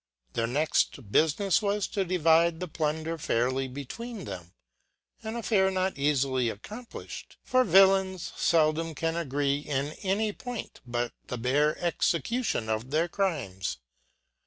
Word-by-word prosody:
Their 115 - 0
next 150 +6 +2 0.2
bufinefs 170 - +3
was 205 -1 0
to 200 - 0
divide 165 -2 +3
the 180 - -3
plunder 160 +1 -2
fairly 130 -2 0
between 195 - -7
them 90 -3 -7 0.7
j 220 - -5
an 225 - -4
affair 210 -5 +2
not 190 0 0
eafily 135 -4 +1
accompliflied; 215 - -9
for 255 0 +3
vnllains 190 -2 +4
feldom 160 0 +2
can 165 +2 -1
agree 145 -3 0
in 145 0 -2
any 205 +2 0
point, 245 -1 -7
but 120 0 -2
the 125 - -4
bare 140 +6 +2
execution 175 - 0
of 110 +3 -2
their 160 +4 +1
crimes. 130 - -2
160 Hz, 135 wpm, -28 LUFS, 135-190 Hz, 0.7 s, vnllains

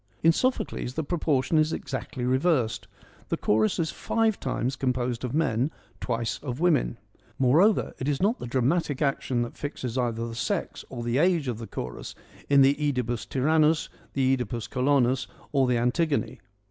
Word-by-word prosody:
In 165 - +7
Sophocles 165 - -1
the 160 - -1
proportion 155 -2 +1
is 155 +1 +2
exactly 130 -5 -4
reversed. 130 -2 +1 0.4
The - - 0
chorus 110 0 +2
is 160 -2 0
five 225 -2 0
times 130 0 -2
composed 125 -2 -1
of 125 +2 -2
men, 135 -4 +1 0.3
twice 115 -2 -2
of 130 -2 -5
women. 160 - +2 0.4
Moreover, 160 - +3
it 130 - -3
is 145 -2 0
not 210 +6 +1
the - - -5
dramatic 135 +4 0
action 130 -3 0
that 120 - -7
fixes 130 -4 -4
either 115 -1 -1
the 115 - -6
sex 115 - -2
or 120 -3 -6
the 120 +3 +1
age 170 -4 +2
of 120 -3 -3
the 115 - -7
chorus - - -6 0.3
in 140 -1 +6
the 135 +1 +5
(Edipus 125 -6 -1
Tyrannus, 155 +3 +2 0.2
the 135 -1 +3
CEdipus 120 -3 -4
Colonus, 130 -1 +2 0.2
or 135 -3 +3
the 125 -1 +2
Antigone. 140 +6 0
130 Hz, 165 wpm, -27 LUFS, 120-155 Hz, 0.4 s, In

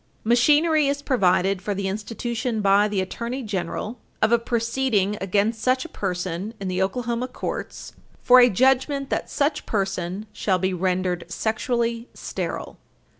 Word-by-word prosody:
§ - - -40 0.2
173. 245 +7 +4
Machinery 310 -3 +3
is 280 +1 -1
provided 190 -7 +2
for 205 +1 -2
the 195 0 -2
institution 225 +3 -3
by 200 +1 +4
the 205 -2 -1
Attorney 235 +7 -4
General 210 +3 -4 0.2
of 215 - +2
a 235 - +5
proceeding 230 -3 0
against 205 +4 0
such 255 +2 +1
a - - -8
person 185 +2 -3
in 195 - -4
the 185 0 -1
Oklahoma 235 +5 -1
courts - - -6 0.3
for 255 0 +7
a 245 0 +7
judgment 265 +5 +2
that - - -1
such 290 +1 -1
person 195 -1 -2
shall 190 -3 +1
be 185 +1 -1
rendered 180 -1 -1
sexually 230 +4 -1
sterile. - - -5
220 Hz, 155 wpm, -24 LUFS, 190-245 Hz, 0.3 s, for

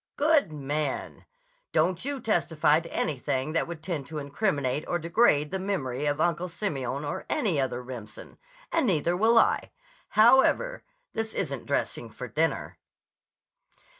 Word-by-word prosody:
"Good 295 - +3
man! 145 -1 -3 0.5
Don't 170 +2 +2
you 280 0 -3
testify 160 -9 +2
to 165 0 -10
anything 140 0 -1
that 165 - +1
would 165 -2 -7
tend 160 -7 -3
to 160 - -6
incriminate 145 -2 -1
or 175 - 0
degrade 165 -3 +3
the 190 - -2
memory 150 -8 -2
of 145 +1 0
Uncle 175 +2 +1
Simeon 145 - -3
or 145 - -4
any 200 - +1
other 125 -1 -2
Remsen. 120 -4 -10 0.3
And 330 -6 +2
neither 170 -2 +2
will 225 +5 +4
I. - - +3 0.5
However, 265 - +5 0.3
this 220 -1 -3
isn't - - -3
dressing - - -2
for - - -7
dinner." - - -1
160 Hz, 140 wpm, -27 LUFS, 145-210 Hz, 0.5 s, However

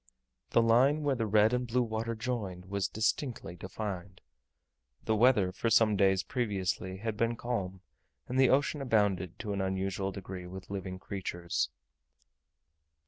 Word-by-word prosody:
The 115 - +4
line 130 +7 +4
where 145 -1 +2
the 115 -4 -1
red 105 +2 +4
and 125 0 0
blue 125 +2 +2
water 115 0 -2
joined 105 -6 -4
was 100 0 -1
distinctly 110 - -1
defined. 95 0 -6 0.9
The 110 - +2
weather 105 -5 +4
for 115 +5 -1
some 110 -1 +5
days 95 -1 +3
previously 95 -5 -2
had 110 +2 -3
been 115 +2 +1
calm, 95 -6 -3 0.5
and 130 +1 -1
the 130 -2 +6
ocean 140 +2 +2
abounded, 100 -8 +1
to 105 - -4
an 100 - -1
unusual 95 +1 -1
degree, 95 -2 -7
with 95 +1 -9
living 95 -2 -4
creatures. 95 -3 -3
105 Hz, 145 wpm, -31 LUFS, 95-115 Hz, 0.9 s, the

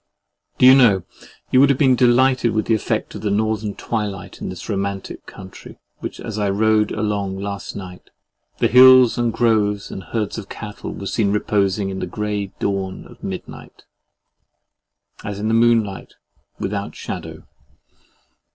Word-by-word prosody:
Do - - +4
you 130 - +10
know, 115 -9 +5 0.5
you 130 - +5
would 140 +1 +6
have 140 - +3
been 130 -3 +4
delighted 125 -1 +3
with 110 -1 0
the 115 - +1
effect 110 - -2
of - - -7
the 105 - -1
Northern 105 0 -1
twilight 105 -5 -5
on - - -4
this - - -8
romantic 100 -1 -4
country 95 -1 -12 0.5
as 110 -1 -5
I 100 -1 0
rode 105 +1 +2
along 100 -3 -2
last 100 0 -6
night? 90 -2 -10 0.5
The - - +2
hills 130 -1 +7
and 120 -1 +1
groves 105 -3 +1
and 95 - -7
herds 110 +1 -3
of 100 - -10
cattle 105 -2 -7
were 100 - -8
seen 100 0 0
reposing 100 -1 0
in 95 - -5
the - - -3
grey 105 +1 -3
dawn 95 -2 -3
of - - -16
midnight, - - -8 1.4
as 105 -1 -5
in 110 +2 -1
a - - +1
moonlight 115 -4 +1 0.4
without 100 +1 -4
shadow. - - -7
105 Hz, 155 wpm, -20 LUFS, 100-115 Hz, 1.4 s, you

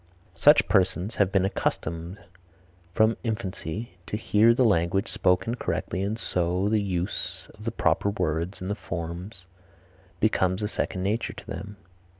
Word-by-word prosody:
Such 145 - +6
persons 95 +1 +1
have 100 -2 +3
been 95 -1 +3
accustomed 85 -1 -2 0.7
from 110 +4 +3
infancy 100 -3 -4
to 105 - -2
hear 110 +1 +4
the 125 +2 +3
language 95 -1 +2
spoken 90 +5 +2
correctly 95 -5 -2
and 100 +3 -1
so 90 -2 0
the 110 -1 +2
use 90 -3 -3
of - - -13
the - - 0
proper 100 - +1
words 85 -2 -2
and 95 +3 -2
forms 85 +1 -6 0.7
becomes 95 -2 +2
a - - +1
second 95 -3 -2
nature 105 +4 -1
to - - -11
them. 100 +4 -7
95 Hz, 145 wpm, -26 LUFS, 90-105 Hz, 0.7 s, Such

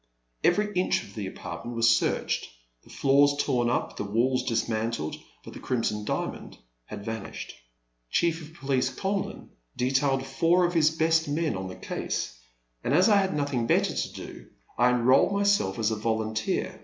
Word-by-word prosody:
Every 210 0 +2
inch 180 -1 +1
of - - -14
the 105 -4 -4
apartment 120 +4 -7
was 115 0 +4
searched, 115 -1 +1 0.4
the - - -20
floors 140 +1 +3
torn 120 -4 +1
up, 120 - -1
the - - -2
walls 120 +6 +1
dis 115 -3 0
mantled, 110 -7 -2 0.3
but - - -9
the - - -9
Crimson 105 -4 -1
Diamond - - -4 0.3
had 100 - -8
van 110 0 -4
ished. - - -8 0.6
Chief 165 - +1
of 160 +1 -12
Police 135 -5 0
Conlin 195 +9 -3 0.3
detailed 135 +1 +1
four 165 +7 +3
of 175 - -1
his 160 -3 +4
best 160 0 +2
men 150 -4 0
on 95 0 -4
the 90 - -7
case, - - -4 0.5
and 135 - +1
as 185 +6 +5
I 205 - +6
had 190 -4 +1
nothing 140 -5 -1
better - - +2
to - - -3
do, - - -9 0.3
I 120 +1 +4
enrolled 125 +8 +4
myself 200 - +2
as 110 -1 +1
a - - 0
volunteer. 110 0 -1
130 Hz, 175 wpm, -27 LUFS, 115-160 Hz, 0.6 s, I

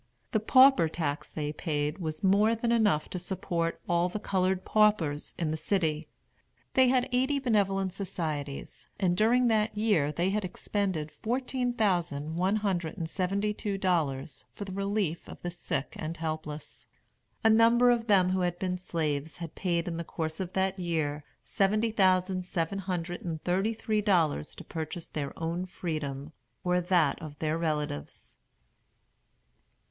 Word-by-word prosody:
The 220 - +2
pauper 255 -6 +6
tax 155 -3 -3
they 150 -1 -3
paid 150 +1 -2
was 155 -1 -4
more 205 +4 +4
than 230 +1 -1
enough 210 -10 +3
to 180 - -3
support 175 -2 -2
all 175 +1 +2
the 185 - -4
colored 190 -1 0
paupers 205 -9 +2
in 160 -3 -1
the 155 - -2
city. 160 -4 0 0.7
They 260 -1 +5
had 250 0 +3
eighty 260 +3 +2
benevolent 195 -7 +1
societies, 155 -7 -4
and 180 -3 +2
during 240 +5 +4
that 215 -1 +1
year 205 -10 +2
they 175 +5 0
had 210 +1 0
expended 185 -4 -2
fourteen 250 +1 -2
thousand 170 -8 0
one 190 +4 +2
hundred 185 -6 -1
and 165 -3 -3
seventy 195 +4 0
two 205 -1 -3
dollars 155 -7 -1
for 205 - -7
the 195 - -7
relief 195 -3 -2
of - - -9
the 175 - -2
sick 175 -5 -3
and 155 +2 -4
the - - -14
helpless. 155 -1 -5 0.6
A 225 - +6
number 235 +2 +6
of 235 -1 0
them 185 -3 +4
who 190 - +1
had 175 -1 0
been 180 0 -2
slaves 155 -4 -2
had 170 -2 -7
paid, 175 -2 -1
in 170 -1 -3
the 170 - -3
course 160 -1 -4
of 185 -1 -4
that 190 0 0
year, 155 -4 -1 0.2
seventy 215 +3 +1
thousand 185 -2 +2
seven 180 +2 -2
hundred 180 -2 -3
and 165 -3 -4
thirty 195 +5 +1
three 215 -1 0
dollars 170 - +1
to - - -9
purchase 165 +1 -5
their 140 -2 -3
own 170 +3 -2
freedom, 155 -5 -4 0.3
or 180 0 +2
that 175 -3 +2
of 150 -2 -8
their 155 +1 -1
relatives. 150 - -3
180 Hz, 165 wpm, -29 LUFS, 160-205 Hz, 0.7 s, pauper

